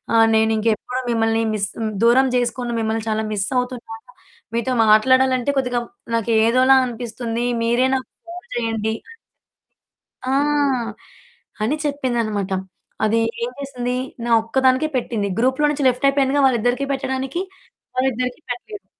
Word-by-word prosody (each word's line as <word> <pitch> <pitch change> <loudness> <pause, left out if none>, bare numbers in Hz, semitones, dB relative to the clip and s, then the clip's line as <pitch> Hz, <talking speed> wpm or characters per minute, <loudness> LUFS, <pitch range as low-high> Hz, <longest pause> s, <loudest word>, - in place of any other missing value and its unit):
ఆహ్, 225 0 +6
నేనింకెప్పుడు 220 +3 +1
మిమ్మల్ని 225 0 +1
మిస్ 205 -1 -1 0.4
దూరం 260 +3 +5
చేసుకొను, 245 0 -1
మిమ్మల్ని 220 0 -2
చాలా 220 0 -1
మిస్ 195 -2 -1
అవుతున్నాను. 245 -3 -4 0.5
మీతో 235 +2 -1 0.2
మాట్లాడాలంటే 260 +4 +4
కొద్దిగా 250 -2 0 0.3
నాకు 230 0 0 0.2
ఏదోలా 255 +3 +5
అనిపిస్తుంది. 235 0 -4 0.2
మీరే 240 +3 +2
నాకు 260 - -3 0.2
ఫోను 345 -4 -9
జేయండి." 225 -2 -1
అని 460 - -14 1.1
ఆ! 260 - -1 1.3
అని 270 +8 +1
చెప్పిందన్నమాట. 235 -8 -1 0.5
అది 225 +2 +2 0.2
ఏం 240 - -1
జేసింది? 250 -3 -3 0.3
నా - - -2
ఒక్కదానికే 260 +4 +2
పెట్టింది 225 -4 -1
గ్రూప్‌లో 260 +5 +2
నుంచి 285 -2 -2
లెఫ్ట్ 255 +2 +1
అయిపోయిందిగా 275 0 +2
వాళ్ళిద్దరికి 245 +2 +1
పెట్టడానికి. 265 +4 -2 0.5
వాళ్ళిద్దరికి 255 +2 -1
పెట్టలేదు. 385 - -6
245 Hz, 120 wpm, -21 LUFS, 225-265 Hz, 1.3 s, ఆహ్